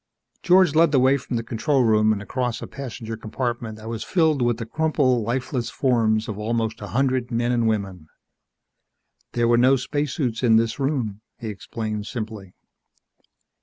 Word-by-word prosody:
George 180 Hz, -3 st, +5 dB
led 165 Hz, 0 st, +4 dB
the 140 Hz, -, +4 dB
way 130 Hz, +2 st, +4 dB
from 130 Hz, -2 st, -4 dB
the 115 Hz, -, -1 dB
control 130 Hz, +4 st, +1 dB
room, 110 Hz, -1 st, +4 dB
and 105 Hz, -1 st, -2 dB
across 125 Hz, +1 st, -2 dB
a -, -, -6 dB
passenger 120 Hz, -4 st, -7 dB
compartment 115 Hz, 0 st, -4 dB
that 110 Hz, 0 st, -10 dB
was 115 Hz, -2 st, -4 dB
filled 160 Hz, -6 st, +2 dB
with 120 Hz, -2 st, +1 dB
the 115 Hz, -, -5 dB
crumpled, 130 Hz, -2 st, +1 dB
lifeless 125 Hz, +2 st, -2 dB
forms 110 Hz, -4 st, +1 dB
of 105 Hz, -1 st, -5 dB
almost 110 Hz, 0 st, -2 dB
a 105 Hz, -, -6 dB
hundred 130 Hz, 0 st, 0 dB
men 120 Hz, 0 st, 0 dB
and 120 Hz, -2 st, +1 dB
women. 95 Hz, -7 st, -2 dB, 1.3 s
"There 120 Hz, -1 st, +1 dB
were 120 Hz, 0 st, +4 dB
no 130 Hz, +2 st, +5 dB
spacesuits 135 Hz, -2 st, -2 dB
in 115 Hz, -3 st, +4 dB
this 115 Hz, +2 st, +1 dB
room," 125 Hz, -8 st, -1 dB, 0.2 s
he 115 Hz, -, -6 dB
explained 105 Hz, 0 st, -5 dB
simply. 110 Hz, -5 st, -6 dB
120 Hz, 165 wpm, -23 LUFS, 110-130 Hz, 1.3 s, George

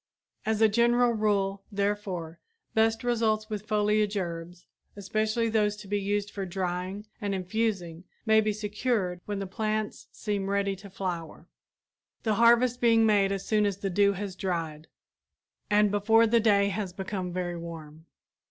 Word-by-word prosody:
As 220 Hz, 0 st, +1 dB
a -, -, +8 dB
general 235 Hz, +2 st, +3 dB
rule, 200 Hz, -3 st, 0 dB
therefore, 200 Hz, -5 st, -2 dB, 0.3 s
best 225 Hz, +1 st, +2 dB
results 220 Hz, -2 st, 0 dB
with 210 Hz, 0 st, -4 dB
foliage 210 Hz, 0 st, +1 dB
herbs, 175 Hz, -1 st, -5 dB, 0.3 s
especially 215 Hz, +3 st, 0 dB
those 210 Hz, -2 st, +1 dB
to 210 Hz, -1 st, -11 dB
be 205 Hz, +1 st, -1 dB
used 205 Hz, +1 st, -1 dB
for 200 Hz, -, -4 dB
drying 185 Hz, +2 st, -3 dB, 0.2 s
and 200 Hz, -1 st, -1 dB
infusing, 185 Hz, -3 st, -2 dB, 0.2 s
may 220 Hz, -1 st, +5 dB
be 215 Hz, 0 st, 0 dB
secured 210 Hz, -3 st, -2 dB
when 205 Hz, -1 st, -2 dB
the 195 Hz, -, -3 dB
plants 215 Hz, +2 st, -3 dB
seem 200 Hz, -2 st, -3 dB
ready 200 Hz, 0 st, 0 dB
to 200 Hz, +1 st, -12 dB
flower, 175 Hz, -4 st, -5 dB, 0.8 s
the 220 Hz, -, +1 dB
harvest 240 Hz, +1 st, +5 dB
being 230 Hz, -1 st, +5 dB
made 200 Hz, -2 st, +3 dB
as 195 Hz, -1 st, -3 dB
soon 215 Hz, -1 st, +2 dB
as 200 Hz, -2 st, 0 dB
the 195 Hz, -1 st, -3 dB
dew 200 Hz, +2 st, +3 dB
has 195 Hz, -1 st, -5 dB
dried 165 Hz, -5 st, -3 dB, 0.8 s
and 210 Hz, -1 st, +4 dB
before 220 Hz, +3 st, +4 dB
the 230 Hz, +1 st, +3 dB
day 200 Hz, -2 st, +3 dB
has 195 Hz, -2 st, -3 dB
become 190 Hz, -1 st, -4 dB
very 175 Hz, -1 st, -3 dB
warm. 160 Hz, -1 st, -9 dB
205 Hz, 155 wpm, -28 LUFS, 185-215 Hz, 0.8 s, a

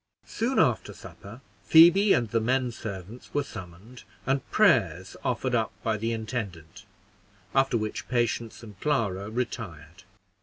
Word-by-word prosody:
Soon 240 Hz, +4 st, -2 dB
after 130 Hz, -8 st, +2 dB
supper, 110 Hz, +6 st, -12 dB, 0.2 s
Phoebe 175 Hz, +5 st, +7 dB
and 120 Hz, -, +3 dB
the 115 Hz, -, +2 dB
men 125 Hz, +2 st, +1 dB
servants 110 Hz, +2 st, -8 dB
were 145 Hz, -, +2 dB
summoned, 95 Hz, +5 st, -11 dB, 0.2 s
and 135 Hz, +1 st, -1 dB
prayers 95 Hz, -, +2 dB
offered 125 Hz, +1 st, -1 dB
up 115 Hz, -2 st, +1 dB
by 110 Hz, -1 st, +1 dB
the 115 Hz, +2 st, -2 dB
intendant, 105 Hz, -6 st, -5 dB, 0.7 s
after 135 Hz, -2 st, +3 dB
which 110 Hz, -1 st, -4 dB
Patience 120 Hz, -2 st, -1 dB
and 105 Hz, -4 st, -12 dB
Clara 105 Hz, -9 st, -1 dB
retired. 95 Hz, -8 st, -5 dB
115 Hz, 130 wpm, -27 LUFS, 100-130 Hz, 0.7 s, Phoebe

